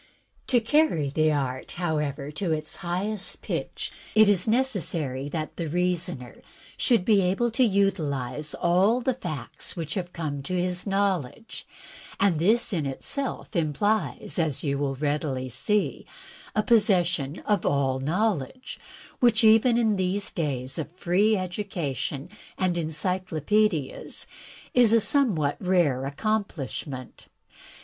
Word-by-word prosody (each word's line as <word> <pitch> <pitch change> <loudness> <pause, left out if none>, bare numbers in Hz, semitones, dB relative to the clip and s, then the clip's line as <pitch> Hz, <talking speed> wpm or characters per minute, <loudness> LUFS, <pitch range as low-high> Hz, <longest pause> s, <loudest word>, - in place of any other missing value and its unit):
To 250 - +4
carry 230 - +2
the 155 +1 +2
art, 130 -3 -2
however, 150 -4 -2
to 165 +3 -2
its 155 0 -3
highest 195 +3 -3
pitch, - - -4 0.2
it 215 -1 +7
is 200 -2 +3
neces 245 -2 +2
sary 140 -5 -2
that 155 0 -4
the 170 - -2
reasoner 175 -6 -2 0.3
shotild 230 -8 +2
be 210 -3 +5
able 195 +6 +1
to 245 +3 +2
utilize 155 - 0
all 190 +8 +3
the 255 +1 0
facts 155 - -5
which 160 -4 -4
have 180 -3 -3
come 150 -5 -4
to 180 +6 -2
his 180 +2 -1
knowledge; 195 - -2 0.5
and 190 -6 +3
this 215 +7 +3
in 155 -6 0
itself 255 - -4
implies, 170 - 0
as 155 -5 0
you 140 -2 -1
will 140 -1 -1
readily 145 -2 -2
see, 200 - 0 0.5
a 215 - +2
possession 180 - +2
of 205 -4 +1
all 135 -2 +1
knowledge, 185 - -2 0.4
which, 235 -2 +4
even 225 +2 +6
in 220 -4 +2
these 190 +2 0
days 135 -3 -2
of 155 0 -4
free 195 +4 +2
education 170 - -3 0.3
and 185 -2 +1
encyclopaedias, 170 0 -1 0.5
is 240 -3 +5
a 230 - +6
somewhat 200 - +2
rare 150 -8 +1
accom 215 +7 0
plishment. 130 -2 -7
175 Hz, 130 wpm, -26 LUFS, 145-210 Hz, 0.5 s, it